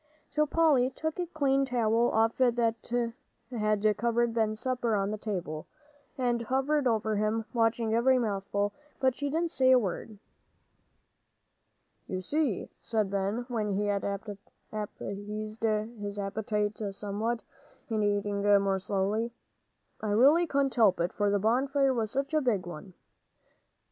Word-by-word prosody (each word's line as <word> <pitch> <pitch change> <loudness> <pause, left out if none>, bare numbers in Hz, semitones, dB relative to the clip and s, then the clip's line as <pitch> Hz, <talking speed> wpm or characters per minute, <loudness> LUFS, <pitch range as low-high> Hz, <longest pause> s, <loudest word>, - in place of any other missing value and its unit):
So 305 0 +2
Polly 290 -5 +3
took 315 +4 -3
off - - -24
the 355 -1 -2
clean 275 -4 +1
towel 235 -2 +2 0.3
that 235 -1 +1 0.4
had 215 -2 +1
covered 235 +1 +1
Ben's 215 -1 0
supper 245 -3 0
on 200 0 0
the 215 - -3
table, 175 -8 -4 0.5
and 240 -2 +1
hovered 270 +4 +1
over 220 -2 +1
him, 215 +1 0
watching 225 -1 +1
every 255 +3 +4
mouthful. 205 -2 -1 0.3
But 260 -1 +3
she 285 +3 -3
didn't 330 +3 0
say 260 -1 +3
a 260 - +8
word. 210 0 -3 1.9
"You 185 - -3
see," 280 - -1
said 215 -4 -1
Ben, 200 +5 -1
when 215 -5 -1
he 205 +2 0
had 200 -1 0 0.7
appeased 210 +1 -5
his 215 -2 -2
appetite 210 +1 -2
somewhat, 210 +4 -2 0.4
and 220 -2 0
eating 205 0 0
more 200 -1 +3
slowly, 200 +4 -1 0.7
"I 215 - -3
really 280 +11 +5
couldn't 275 -2 +1
help 215 -7 +4
it, 170 +1 0
for 205 -1 +1
the 205 - +2
bonfire 265 +6 +2
was 225 -3 -1
such 275 +5 -2
a 310 - +3
big 215 -9 0
one." 175 +2 -9
220 Hz, 140 wpm, -29 LUFS, 205-255 Hz, 1.9 s, a